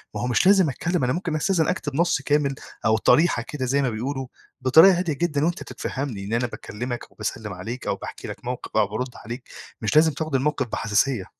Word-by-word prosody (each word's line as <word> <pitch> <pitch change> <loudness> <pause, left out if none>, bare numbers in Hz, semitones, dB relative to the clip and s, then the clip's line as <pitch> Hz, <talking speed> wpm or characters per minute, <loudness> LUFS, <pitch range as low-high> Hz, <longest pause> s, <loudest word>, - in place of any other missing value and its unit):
ما - - -2
هو 125 - -1
مش 125 +8 +2
لازم 190 -6 +6
أتكلّم 170 +3 -1
أنا 125 - +2
ممكن 170 -3 -2
أستأذن 165 0 +1
أكتب 145 -6 -2
نَص 170 -4 +2
كامل 145 -1 +1 0.3
أو 110 0 +4
طريحة 150 +2 +4
كده 135 -3 -3
زي 140 +3 +2
ما 130 - +1
بيقولوا 130 +4 -3 0.3
بطريقة 160 +8 +7
هادية 175 -4 0
جدًا 150 -1 0
وأنت 175 0 -1
تتفهَّمني 130 -8 -5
إن 105 - -4
أنا 120 +1 +1
باكلّمك 120 +2 -6
وباسلِّم 105 -1 -5
عليك 110 +8 -6
أو - - +1
باحكي - - -8
لك - - -8
موقف 125 -3 -4
أو 105 -2 +4
بارُد 125 +5 -3
عليك، 120 +3 -8 0.3
مش 110 +6 -1
لازم 160 +1 +6
تاخُد 155 -1 -3
الموقف 135 -1 0
بحساسية. 105 0 0
135 Hz, 205 wpm, -24 LUFS, 120-155 Hz, 0.3 s, بطريقة